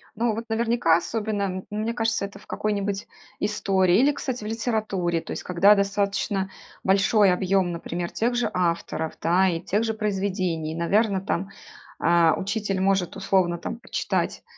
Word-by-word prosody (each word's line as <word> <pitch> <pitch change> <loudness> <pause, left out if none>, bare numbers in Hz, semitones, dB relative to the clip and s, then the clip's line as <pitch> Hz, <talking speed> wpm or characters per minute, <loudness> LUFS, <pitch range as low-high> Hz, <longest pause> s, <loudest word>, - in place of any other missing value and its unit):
Ну, 225 0 0
вот 230 +1 -5
наверняка, 225 -7 +3
особенно, 205 +3 -2
м, 185 -1 -3
мне 215 +2 -2
кажется, 225 -3 0
это 200 0 -10
в - - -16
какой-нибудь 200 -1 -2 0.3
истории 190 -3 +2
или, 280 +4 +5
кстати, 260 -5 -4
в - - -5
литературе. 215 -7 -1
То - - -9
есть - - -5
когда 185 +3 +5
достаточно 200 -1 0 0.3
большой 195 +1 +4
объём, 185 0 +1
например, 170 +1 -4
тех 240 +2 0
же 240 - +1
авторов, 170 -2 -1
да, 180 +3 +3
и 165 -2 -2
тех 205 +4 0
же 225 -1 -1
произведений, 190 -6 -2
наверно, 195 +4 +1
там, 190 0 -2 0.5
а, 170 -1 +4
учитель 200 -1 -2
может, 190 -2 +1
условно, 185 -3 +1
там, 225 +7 -5
прочитать 235 - -2
195 Hz, 155 wpm, -25 LUFS, 180-215 Hz, 0.5 s, или